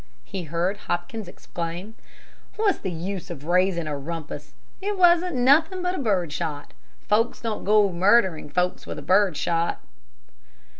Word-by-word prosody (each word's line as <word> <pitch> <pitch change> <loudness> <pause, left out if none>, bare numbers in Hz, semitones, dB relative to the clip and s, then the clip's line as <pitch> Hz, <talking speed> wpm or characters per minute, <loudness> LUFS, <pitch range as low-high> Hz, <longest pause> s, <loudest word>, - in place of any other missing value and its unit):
he 190 -4 -6
heard 170 +5 -1
Hopkins 185 +3 -4
exclaim. 175 +3 -6 0.6
"What's 425 -3 +1
the 190 - -3
use 180 +2 -5
of 155 -5 -7
raising 180 0 +2
a 150 -1 -3
rumpus? 160 +2 -7 0.3
It 405 +1 -2
wasn't 350 -2 +4
nothing 320 +9 +4
but 360 -5 -1
bird 180 - 0
shot. 150 -2 -4 0.3
Folks 225 +3 +1
don't 225 -2 -3
go 205 -1 +4
murdering 185 -3 +3
folks 180 +3 -1
with - - -6
bird 190 -4 +3
shot." 165 +2 0
190 Hz, 140 wpm, -25 LUFS, 170-230 Hz, 0.6 s, wasn't